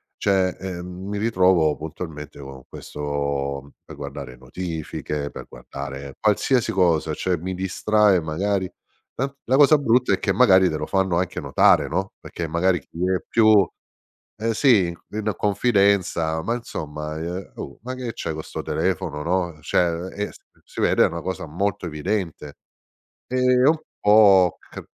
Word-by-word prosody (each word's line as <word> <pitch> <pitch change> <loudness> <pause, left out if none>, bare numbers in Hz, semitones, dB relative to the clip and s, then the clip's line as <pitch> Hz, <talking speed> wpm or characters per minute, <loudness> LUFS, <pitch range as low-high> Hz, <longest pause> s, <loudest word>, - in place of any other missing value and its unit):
cioè, 95 -2 +1
ehm, 90 -2 -6 0.2
mi 105 - -3
ritrovo 95 -7 +3
puntualmente 75 -2 -8
con 65 -2 -10
questo 70 -1 -4
per - - -12
guardare 70 -3 -7
notifiche, 75 0 -5
per - - -9
guardare 70 0 -8
qualsiasi 110 +4 +2
cosa, 85 -4 +2
cioè 90 +3 -1
mi 95 +3 -4
distrae 100 +1 +2
magari. 95 +4 -1 0.4
La 135 +2 -2
la 130 +3 +2
cosa 150 +1 +7
brutta 125 -3 +2
è - - 0
che - - 0
magari 95 -7 +5
te 80 - -2
lo - - -3
fanno 95 -3 +1
anche 90 -1 -2
notare, - - +4
no, 95 +4 -2
perché 85 - -6
magari 90 +3 +1
chi 75 - -16 0.2
è 90 - -1
più, 110 -4 +5 0.7
eh 115 +1 -1
sì, 115 -10 +4 0.2
in 105 0 -2
confidenza: 100 -6 +2
"Ma 115 +8 -1
insomma, 75 -9 -6
ehm 90 +4 -5
oh! 70 - -8
Ma 130 +1 -5
che 125 -2 -5
c'hai 80 - -4
co 80 - -5
sto - - -7
telefono?" 80 -3 -2
No, 85 -1 -1
cioè - - +1
ehm, 85 +2 -3
e 105 0 -3 0.3
si - - -7
vede - - +4
è - - +5
una 85 0 -5
cosa 95 +2 -4
molto 90 +5 -2
evidente. 85 -2 -3 0.7
Ehm, 125 0 +3
un 160 +2 +4 0.2
po' 100 -4 +5
c - - -11
90 Hz, 155 wpm, -23 LUFS, 75-105 Hz, 0.7 s, cosa